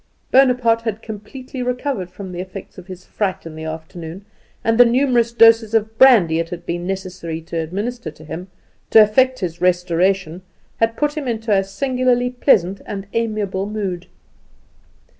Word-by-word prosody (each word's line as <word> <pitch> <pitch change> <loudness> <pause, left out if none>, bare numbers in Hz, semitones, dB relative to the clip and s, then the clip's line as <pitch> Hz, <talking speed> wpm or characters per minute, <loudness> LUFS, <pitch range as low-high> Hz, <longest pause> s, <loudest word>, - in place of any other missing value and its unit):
Bonaparte 250 -3 +4
had 225 -1 -4
completely 250 +5 -8
recovered 250 -6 -2
from 190 +1 -9
the 175 - -6
effects 185 +1 -8
of 180 - -14
his 185 -1 -10
fright 195 -5 -3
in 165 - -8
the 160 0 -7
afternoon, 160 +3 -8 0.4
and 225 +1 +1
the - - +11
numerous 240 -1 +2
doses 225 -1 +5
of 220 0 0
brandy 215 -12 +6
that 165 - 0
it - - -19
had 175 -1 -7
been 175 +1 -3
necessary 185 -4 -5
to 165 +1 -7
administer 200 +6 -3
to 155 +1 -14
him 165 +4 -7 0.4
to 225 - +7
effect 255 +4 +4
his 175 -2 -4
restoration 180 0 +1 0.4
had 225 0 0
put 295 0 0
him 300 -4 -4
into 225 -2 -2
a 195 -1 +4
singularly 250 +3 0
pleasant 200 -7 +2
and 195 -1 -5
amiable 210 -4 -2
mood. 195 -5 -4
205 Hz, 165 wpm, -19 LUFS, 180-235 Hz, 0.4 s, the